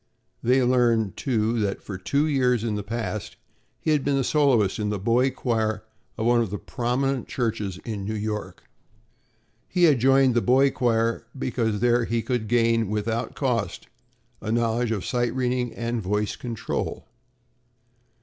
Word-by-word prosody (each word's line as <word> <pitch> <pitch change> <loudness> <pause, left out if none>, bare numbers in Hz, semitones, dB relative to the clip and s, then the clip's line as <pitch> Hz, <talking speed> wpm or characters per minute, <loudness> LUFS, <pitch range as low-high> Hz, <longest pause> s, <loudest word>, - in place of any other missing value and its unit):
They 130 +2 +3
learned 120 -5 +2
too 115 -3 0
that 100 -2 -2
for 100 - -6
two 140 +10 +1
years 125 -6 +1 0.2
past 105 -3 -4 0.4
he 155 - 0
had 150 -3 +2
been 140 0 +1
the 135 - +1
soloist 130 -10 +2
in 105 -1 -1
the 105 - -1
boy 120 +7 +2
choir 110 -5 -1 0.3
of 110 - -2
one 120 0 +4
of 115 - -1
the 105 - -3
prominent 125 +3 -1
churches 110 -6 -2
in 105 -4 -4
New 110 +3 -3
York. 105 0 -4 1.0
He 180 -1 0
had 150 -7 +5
joined 135 +1 +4
the 120 - +2
boy 135 +3 +4
choir 115 -2 0
because 115 -5 -1
there 120 0 +3
he 115 0 -1
could 120 -5 -2
gain, 115 -2 +2
without 110 +2 -2
cost, 125 -6 -2 0.5
a 110 - -3
knowledge 115 +1 +1
of 105 -5 -2
sight 120 -1 -1
reading 125 -1 0
and 115 0 -2
voice 105 +2 -1
control. 115 -3 -4
115 Hz, 155 wpm, -25 LUFS, 110-125 Hz, 1.0 s, had